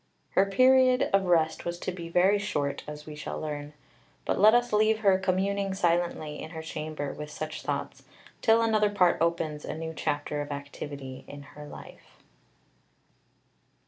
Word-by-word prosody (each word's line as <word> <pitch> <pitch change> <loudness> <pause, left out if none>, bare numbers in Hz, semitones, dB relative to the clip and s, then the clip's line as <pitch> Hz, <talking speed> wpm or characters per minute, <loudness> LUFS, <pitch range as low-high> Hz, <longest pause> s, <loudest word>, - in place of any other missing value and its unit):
Her 195 +1 +3
period 255 +4 +4
of 195 -1 +4
rest 160 -3 +2
was 170 0 -3
to - - -2
be 170 -2 -7
very 190 +4 +4
short, 145 -9 -2
as 150 0 -8
we 155 - -8
shall 150 - -5
learn; 150 -1 -5 0.5
but - - 0
let 215 +3 +7
us 240 -1 +1
leave 215 +1 +3
her 195 -3 +4
communing 195 +1 0
silently 170 -4 0
in - - -7
her 160 -1 -7
chamber 155 -2 -5
with 150 0 -7
such 155 +1 -6
thoughts, - - -4 0.4
till 225 0 +4
another 215 -2 +3
Part 185 -5 +2
opens 165 -3 0
a - - -5
new 160 0 -5
chapter 145 -1 -2
of 145 - -6
activity 140 -2 -7
in 145 0 -9
her 145 +1 -11
life. - - -13
170 Hz, 165 wpm, -28 LUFS, 150-200 Hz, 0.5 s, let